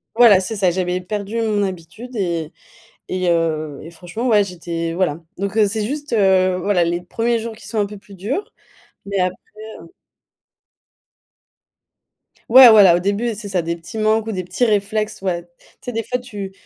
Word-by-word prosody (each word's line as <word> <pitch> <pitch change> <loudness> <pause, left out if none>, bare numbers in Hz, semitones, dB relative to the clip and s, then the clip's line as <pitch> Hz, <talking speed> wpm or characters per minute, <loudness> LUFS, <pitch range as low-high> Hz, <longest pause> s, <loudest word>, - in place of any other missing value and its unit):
Voilà 230 -5 +7
c'est 190 +4 -4
ça, 195 -3 +2
j'avais 180 0 -1
perdu 205 +4 -4
mon 210 -2 0
habitude 190 +7 -7
et 170 -6 -2 0.6
et 185 -1 -1
heu, 155 -3 -1
et 165 - -9
franchement, 175 +8 -6
ouais, 215 -4 +4
j'étais 170 -3 -4
voilà. 170 -3 -1 0.2
Donc 200 +2 -3
heu, 210 -2 +4
c'est 215 0 -2
juste, 290 0 -5
heu, 190 -3 +3
voilà, 185 0 +1
les 170 +1 0
1ers 230 +6 -1
jours 225 0 -6
qui 220 - -13
sont 225 - -3
un 205 - +2
peu 210 - -10
plus 200 0 -16
durs, 230 - -4 0.5
mais 200 -1 -2
après, 185 0 +1 0.5
heu. - - -13 2.6
Ouais, 255 +1 +10
voilà, 200 -6 +7
au 175 - +1
début, 205 +5 -1
c'est 205 0 -8
ça, 190 -3 0
des 170 +1 -3
petits 170 +7 -10
manques 215 0 +1
ou 225 - -2
des 185 -2 -3
petits 180 +8 -1
réflexes, 215 0 -1
ouais. 175 -3 -2
Tu - - -28 0.4
sais, 245 - -3
des 225 - -2
fois, 250 +3 -2
tu 205 -6 -7
200 Hz, 185 wpm, -19 LUFS, 180-220 Hz, 2.6 s, Ouais